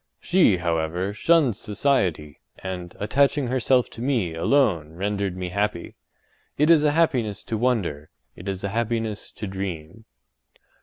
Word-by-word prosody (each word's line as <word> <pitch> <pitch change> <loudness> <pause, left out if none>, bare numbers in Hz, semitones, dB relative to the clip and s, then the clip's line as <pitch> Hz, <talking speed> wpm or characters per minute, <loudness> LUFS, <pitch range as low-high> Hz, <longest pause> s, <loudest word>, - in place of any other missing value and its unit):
She, 175 - +3
however, 85 +3 -1
shunned 145 0 +3
society, 95 - -1 0.2
and, 90 -2 -6
attaching 140 +6 +2
herself 125 0 +2
to 115 - -9
me 120 -10 0
alone 85 - +1
rendered 100 +1 -2
me 90 -1 -4
happy. 100 -2 -2 0.6
It 150 +3 +4
is 155 -3 +6
a 150 -1 +3
happiness 120 - +1
to 115 - -3
wonder; 105 - -1 0.3
it 90 - -11
is 95 -1 -4
a 100 - -1
happiness 115 -1 -2
to - - -6
dream. 95 0 -6
105 Hz, 140 wpm, -24 LUFS, 90-125 Hz, 0.6 s, is